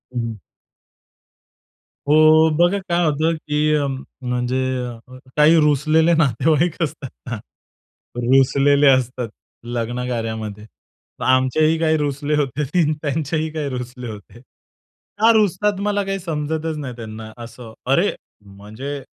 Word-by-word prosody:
हं, -, -, 0 dB
हं. 115 Hz, -3 st, -5 dB, 1.7 s
हो, 155 Hz, +1 st, +6 dB
बघा 175 Hz, +4 st, +3 dB
काय 170 Hz, 0 st, +2 dB
होतं, 155 Hz, +2 st, +1 dB
की 150 Hz, 0 st, 0 dB
अ, 145 Hz, -1 st, +1 dB, 0.4 s
म्हणजे 125 Hz, +1 st, -1 dB, 0.8 s
काही 155 Hz, +3 st, +6 dB
रुसलेले 155 Hz, +3 st, +3 dB
नातेवाईक 155 Hz, -, +1 dB
असतात 145 Hz, -4 st, -5 dB, 0.2 s
ना. 120 Hz, -, -3 dB, 0.8 s
रुसलेले 135 Hz, +3 st, +4 dB
असतात 125 Hz, -2 st, +2 dB, 0.4 s
लग्नकार्यामध्ये. 115 Hz, -3 st, -4 dB
तर -, -, -16 dB
आमचेही 130 Hz, +5 st, +3 dB
काही 160 Hz, -1 st, +2 dB
रुसले 145 Hz, 0 st, -1 dB
होते. 145 Hz, 0 st, -1 dB
ती 155 Hz, +1 st, +1 dB
त्यांचेही 155 Hz, +1 st, -1 dB
काही 150 Hz, -3 st, -3 dB
रुसले 125 Hz, -1 st, -6 dB
होते. 105 Hz, +2 st, -12 dB, 0.8 s
का 225 Hz, +1 st, +6 dB
रुसतात 210 Hz, -1 st, +1 dB
मला 205 Hz, 0 st, 0 dB
काही 195 Hz, 0 st, -2 dB
समजतच 160 Hz, -1 st, -3 dB
नाही. 130 Hz, -5 st, -6 dB
त्यांना 110 Hz, -1 st, -8 dB
असं, 115 Hz, -1 st, -10 dB, 0.2 s
अरे 175 Hz, +9 st, +3 dB, 0.3 s
म्हणजे, 110 Hz, +8 st, -8 dB
145 Hz, 115 wpm, -20 LUFS, 125-160 Hz, 1.7 s, हो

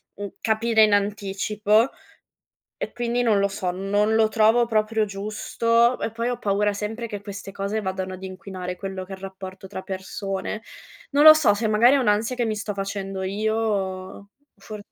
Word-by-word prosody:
mhmm, 205 Hz, 0 st, -5 dB
capire 220 Hz, 0 st, +3 dB
in 210 Hz, -1 st, +4 dB
anticipo, 210 Hz, +2 st, +1 dB, 0.9 s
e -, -, -4 dB
quindi, 240 Hz, 0 st, -1 dB
non 215 Hz, -4 st, +3 dB
lo 200 Hz, -, +3 dB
so, 195 Hz, -2 st, -3 dB
non 205 Hz, +4 st, 0 dB
lo 220 Hz, -1 st, +4 dB
trovo 225 Hz, +2 st, +4 dB
proprio 220 Hz, 0 st, +1 dB
giusto. 230 Hz, +4 st, +1 dB
E 225 Hz, -, -2 dB
poi 230 Hz, +2 st, -2 dB
ho 245 Hz, -, -2 dB
paura 205 Hz, 0 st, +1 dB
sempre 220 Hz, +3 st, -4 dB
che 205 Hz, -3 st, -6 dB
queste 200 Hz, -1 st, -8 dB
cose 200 Hz, +2 st, -2 dB
vadano 190 Hz, -1 st, -3 dB
ad 185 Hz, -, -9 dB
inquinare 185 Hz, -1 st, -6 dB
quello 190 Hz, 0 st, -5 dB
che 195 Hz, -, -9 dB
è -, -, -4 dB
il 190 Hz, -, -18 dB
rapporto 190 Hz, 0 st, -8 dB
tra 190 Hz, -1 st, -6 dB
persone. 195 Hz, +2 st, -5 dB, 0.5 s
Non 290 Hz, +1 st, +4 dB
lo 310 Hz, -, +12 dB
so, 305 Hz, -10 st, +4 dB
se 220 Hz, +1 st, -1 dB
magari 235 Hz, +5 st, +5 dB
è -, -, +4 dB
un'ansia 220 Hz, +1 st, +1 dB
che 245 Hz, -, 0 dB
mi 220 Hz, -1 st, -1 dB
sto 205 Hz, 0 st, -4 dB
facendo 195 Hz, -1 st, -4 dB
io 215 Hz, +3 st, -1 dB
o 200 Hz, -2 st, -3 dB, 0.3 s
fo 210 Hz, +2 st, -9 dB
205 Hz, 185 wpm, -24 LUFS, 195-225 Hz, 0.9 s, lo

